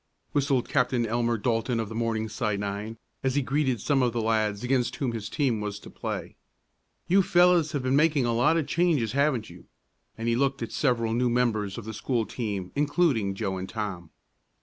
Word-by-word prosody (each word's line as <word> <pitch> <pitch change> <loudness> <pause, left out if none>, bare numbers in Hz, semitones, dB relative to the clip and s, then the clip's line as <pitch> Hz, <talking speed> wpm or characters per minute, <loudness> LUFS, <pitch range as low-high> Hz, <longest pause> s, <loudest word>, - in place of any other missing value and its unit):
whistled 140 -3 +1
Captain 125 -3 +1
Elmer 115 +1 0
Dalton 115 +2 0
of 110 - -2
the 110 - -8
Morningside 110 -2 -1
nine, 100 +2 -4 0.2
as 130 0 0
he 145 - +2
greeted 135 -3 0
some 140 +5 +1
of 120 -2 +1
the 120 - -1
lads 110 -2 0
against 125 -1 +1
whom 130 -4 -1
his 110 -2 -5
team 125 -7 0
was 105 -1 -4
to - - -12
play, - - -5 0.7
"you 195 +3 +5
fellows 175 -3 +4
have 140 -3 -1
been 130 +1 +1
making 150 -3 +3
a 120 - +1
lot 150 +8 +3
of 160 - 0
changes, 155 -11 +1
haven't 135 -5 +1
you?" - - -14 0.5
and 115 - -3
he 115 - +2
looked 135 0 0
at 115 - -4
the - - -12
several 115 -5 +1
new 125 +1 +2
members 110 -5 0
of 115 - -7
the 110 - -5
school 115 +1 -1
team, 105 -4 -4
including 145 - +1
Joe 95 -2 -2
and 95 +1 -6
Tom. 95 -6 -5
120 Hz, 200 wpm, -27 LUFS, 110-135 Hz, 0.7 s, you